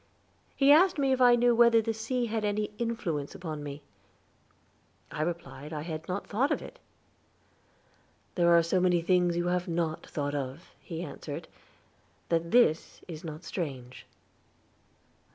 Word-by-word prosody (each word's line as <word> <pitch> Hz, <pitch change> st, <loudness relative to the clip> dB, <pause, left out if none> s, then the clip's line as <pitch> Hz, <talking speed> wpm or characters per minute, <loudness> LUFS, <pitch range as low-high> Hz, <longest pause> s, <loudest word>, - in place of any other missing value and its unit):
He 275 Hz, 0 st, +5 dB
asked 360 Hz, +4 st, +6 dB
me 275 Hz, -2 st, +2 dB
if 260 Hz, -1 st, +1 dB
I 245 Hz, -1 st, +7 dB
knew 240 Hz, 0 st, +4 dB
whether 235 Hz, 0 st, +6 dB
the 225 Hz, 0 st, -1 dB
sea 240 Hz, +3 st, -2 dB
had 220 Hz, -1 st, -2 dB
any 210 Hz, 0 st, -1 dB
influence 175 Hz, -12 st, -3 dB
upon 155 Hz, -4 st, -6 dB
me; 145 Hz, 0 st, -7 dB, 1.3 s
I -, -, -4 dB
replied 170 Hz, -3 st, -4 dB
that -, -, -3 dB
I -, -, -3 dB
had 160 Hz, -1 st, -6 dB
not 185 Hz, +2 st, -3 dB
thought 255 Hz, +8 st, 0 dB
of -, -, +1 dB
it. -, -, -11 dB, 1.5 s
"There 175 Hz, -2 st, +3 dB
are 170 Hz, -, +4 dB
so 170 Hz, +3 st, +1 dB
many 180 Hz, -2 st, +2 dB
things 180 Hz, -1 st, +2 dB
you 175 Hz, -, 0 dB
have 180 Hz, 0 st, -1 dB
not 165 Hz, -2 st, -2 dB
thought 145 Hz, -1 st, -3 dB
of," 140 Hz, +3 st, -5 dB
he 165 Hz, 0 st, -6 dB
answered, 155 Hz, -, -7 dB, 0.8 s
"that 170 Hz, 0 st, 0 dB
this 200 Hz, -9 st, +2 dB
is 160 Hz, -3 st, -8 dB
not 155 Hz, 0 st, -7 dB
strange." 135 Hz, -9 st, -6 dB
175 Hz, 155 wpm, -29 LUFS, 155-230 Hz, 1.5 s, I